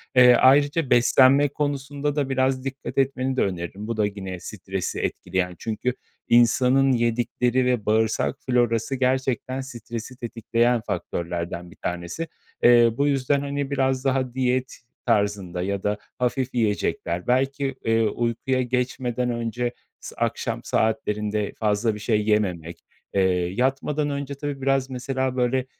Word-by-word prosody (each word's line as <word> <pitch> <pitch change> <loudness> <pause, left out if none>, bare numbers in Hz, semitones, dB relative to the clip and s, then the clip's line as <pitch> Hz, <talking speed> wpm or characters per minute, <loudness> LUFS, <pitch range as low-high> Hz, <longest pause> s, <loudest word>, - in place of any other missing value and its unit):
Eee, 125 -1 +8
ayrıca 145 +4 +4
beslenme 130 +3 +5
konusunda 145 0 -2
da 145 -3 0
biraz 130 0 +1
dikkat 135 -2 -6
etmeni 135 -1 +1
de - - +3
öneririm, 95 +3 -3
bu 115 - -3
da 105 - +3
yine 95 -3 -5
stresi 95 -1 -4
etkileyen, 90 0 -2
çünkü 115 +3 -2 0.4
insanın 125 +3 +4
yedikleri 120 +1 +1
ve 125 -4 0
bağırsak 110 -10 +1
florası 120 0 +1
gerçekten 130 0 0
stresi 120 -1 -7
tetikleyen 120 0 0
faktörlerden 85 -2 -4
bir - - -15
tanesi. 90 - -4 0.4
Eee, 120 -1 +7
bu 140 - +2
yüzden, 140 0 +1
hani, 140 0 -3
biraz 130 -1 0
daha 130 -2 0
diyet 130 0 -1 0.3
tarzında 100 -6 0
ya 100 +1 -2
da 105 0 0 0.2
hafif 125 +1 -1
yiyecekler, 100 -5 -1
belki, 135 +2 +1
eee, 115 0 +3
uykuya 120 +4 0
geçmeden 125 0 -1
önce 120 +1 -2 0.3
s - - -10
akşam - - -2
saatlerinde 105 -1 -1
fazla 105 +1 +1
bir 105 - -8
şey 105 -1 0
yememek, 90 -6 0 0.3
eee, 100 - +3 0.3
yatmadan 135 +5 0
önce, 140 0 -4
tabii, 140 -1 -5
biraz, 135 0 +1
mesela, 130 0 -2
böyle, 125 +1 +1
125 Hz, 135 wpm, -24 LUFS, 105-135 Hz, 0.4 s, Eee